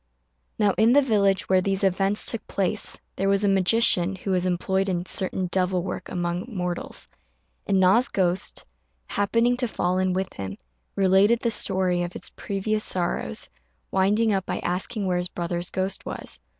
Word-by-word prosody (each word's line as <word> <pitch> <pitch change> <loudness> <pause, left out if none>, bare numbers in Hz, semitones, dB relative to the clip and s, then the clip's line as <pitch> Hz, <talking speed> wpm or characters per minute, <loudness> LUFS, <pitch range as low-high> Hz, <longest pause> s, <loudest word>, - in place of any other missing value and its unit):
Now 205 -1 +3
in 225 +2 +5
the 285 - +6
village 200 -6 +2
where 185 -1 +3
these 195 +1 -1
events 195 +2 +3
took 230 - -3
place 200 +2 0 0.2
there 195 +1 0
was 200 +1 +2
a - - +3
magician 195 -1 +3
who 190 +1 -4
was 185 -1 +1
employed 190 +2 0
in 175 -1 -2
certain 185 0 -1
devil 185 -1 +1
work 180 - -5
among 175 +2 -2
mortals, 180 -6 -4 0.6
and 195 - +2
Na's 195 +8 +4
ghost, 185 -1 -1 0.4
happening 230 +4 +1
to 250 -1 0
fall 180 -4 -1
in 185 -1 +1
with 190 +1 -2
him, 95 -1 -6 0.4
related 195 +4 +4
the 235 - 0
story 185 -4 +1
of 175 0 -4
its - - -7
previous 210 +2 -2
sorrows, 175 - -1 0.4
winding 210 +3 +2
up 190 -1 -1
by - - -2
asking 195 +4 -2
where 180 -1 0
his 180 0 -2
brother's 175 0 -3
ghost 190 +1 -2
was. - - -5
190 Hz, 170 wpm, -25 LUFS, 180-205 Hz, 0.6 s, the